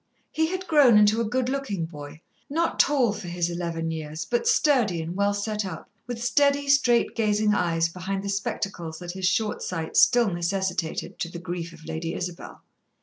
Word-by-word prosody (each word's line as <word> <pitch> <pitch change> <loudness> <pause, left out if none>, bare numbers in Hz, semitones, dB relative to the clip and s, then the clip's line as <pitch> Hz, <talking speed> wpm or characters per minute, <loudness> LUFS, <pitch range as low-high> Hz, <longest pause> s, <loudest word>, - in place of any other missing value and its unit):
He 320 0 +1
had 370 +2 -4
grown 285 - +6
into 210 +2 +4
a 225 - -1
good 255 +1 0
looking 255 -10 -2
boy, 150 -1 -10 0.3
not 330 +3 -1
tall 260 -7 +3
for 200 -3 -7
his 175 0 -1
eleven 165 -1 -3
years, 155 0 -5
but 240 +4 -1
sturdy 240 - +3
and 165 +2 -5
well 200 +1 +1
set 210 +1 -2
up, 190 - -7 0.2
with 240 -1 -5
steady, 285 +2 +2
straight 250 -4 +3
gazing 210 -1 +2
eyes 165 -4 +1
behind 190 +3 -4
the 200 - -4
spectacles 195 -4 -3
that 175 0 -6
his 185 0 -1
short 215 +2 0
sight 165 -3 -4
still 240 -4 +5
necessitated, 175 -1 -2
to 170 - -2
the 170 - -8
grief 170 -1 -5
of 165 -1 -15
Lady 160 +1 -4
Isabel. 175 -1 -7
195 Hz, 185 wpm, -25 LUFS, 170-235 Hz, 0.3 s, grown